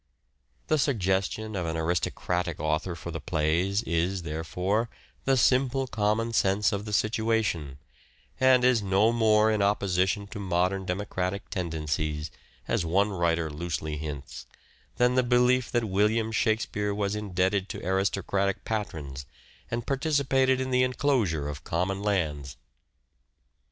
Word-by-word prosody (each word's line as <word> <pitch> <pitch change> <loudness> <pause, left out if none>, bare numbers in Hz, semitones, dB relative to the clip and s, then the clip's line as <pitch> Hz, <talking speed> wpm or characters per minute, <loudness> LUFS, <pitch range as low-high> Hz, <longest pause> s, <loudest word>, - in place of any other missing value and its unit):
The 155 -1 +1
suggestion 105 -3 0
of 90 -3 -2
an 80 0 -2
aristocratic 85 +1 -1
author 80 +3 -1
for 85 0 -7
the 80 - -5
plays 90 +5 0
is, 85 +1 -1
therefore, 90 +8 -1 0.4
the 135 0 +3
simple 130 +1 +3
common 110 0 0
sense 100 0 +2
of 100 0 -3
the 105 - -6
situation, 110 - 0 0.6
and 130 -1 +5
is 125 -3 +4
no 100 +3 +3
more 110 -2 +4
in 105 -1 +1
opposition 100 0 +1
to 110 - -7
modern 95 0 0
democratic 95 +1 -3
tendencies, 75 -3 -2 0.4
as - - +1
one 100 +5 +2
writer 85 -3 +1
loosely 80 -1 -3
hints, 70 -5 -7 0.5
than 125 0 +3
the 130 - +4
belief 125 0 +3
that 120 -1 +1
William 110 +2 +1
Shakspere 105 -2 0
was 100 0 -1
indebted 95 -1 0
to - - -6
aristocratic 95 +1 0
patrons 75 -11 -4 0.4
and 120 0 -3
participated 135 -2 +2
in 130 0 -2
the 125 0 +3
enclosure 125 - +1
of 70 -1 -6
common 95 +3 -1
lands. 75 -10 -1
100 Hz, 130 wpm, -27 LUFS, 85-115 Hz, 0.6 s, and